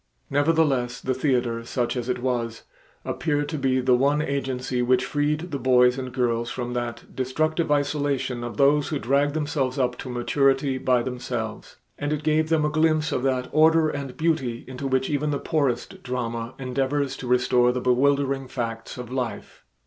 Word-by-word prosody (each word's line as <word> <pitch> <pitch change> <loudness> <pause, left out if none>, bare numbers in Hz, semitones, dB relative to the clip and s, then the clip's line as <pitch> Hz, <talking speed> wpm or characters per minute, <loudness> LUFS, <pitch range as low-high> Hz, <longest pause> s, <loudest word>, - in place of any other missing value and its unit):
Nevertheless 140 -4 +2
the 130 - -1
theater, 125 -4 0
such 120 +1 -2
as 125 0 -3
it 125 -1 -2
was, 120 -3 -2 0.4
appeared 145 -2 -1
to 155 - -3
be 130 -1 +2
the 125 0 +3
one 140 +4 +2
agency 130 -3 -2
which 125 +1 +2
freed 150 +4 -1
the 140 - -2
boys 125 0 +4
and 130 -1 -5
girls 120 -2 0
from 120 -1 -4
that 120 -1 -5
destructive 155 +5 0
isolation 145 -4 0
of 120 0 -6
those 145 +1 +4
who 155 - -1
drag 140 +3 +1
themselves 145 -4 -1
up 125 -2 0
to 130 - -6
maturity 135 +2 +1
by 125 -2 +2
themselves, 125 -3 -5 0.2
and 145 0 -2
it 150 0 -2
gave 155 0 +2
them 160 -2 +2
a - - +2
glimpse 155 0 +2
of - - 0
that 130 -1 0
order 160 +1 +5
and 140 -3 -5
beauty 155 -8 -1
into 130 +1 -5
which 130 0 +1
even 150 0 0
the 145 - 0
poorest 140 -5 -1
drama 120 -1 -4
endeavors 135 +1 -1
to 125 - -7
restore 125 0 +3
the 125 - -2
bewildering 135 +1 +2
facts 115 -2 -5
of 125 -1 -7
life. 125 -5 -5
130 Hz, 175 wpm, -24 LUFS, 125-145 Hz, 0.4 s, order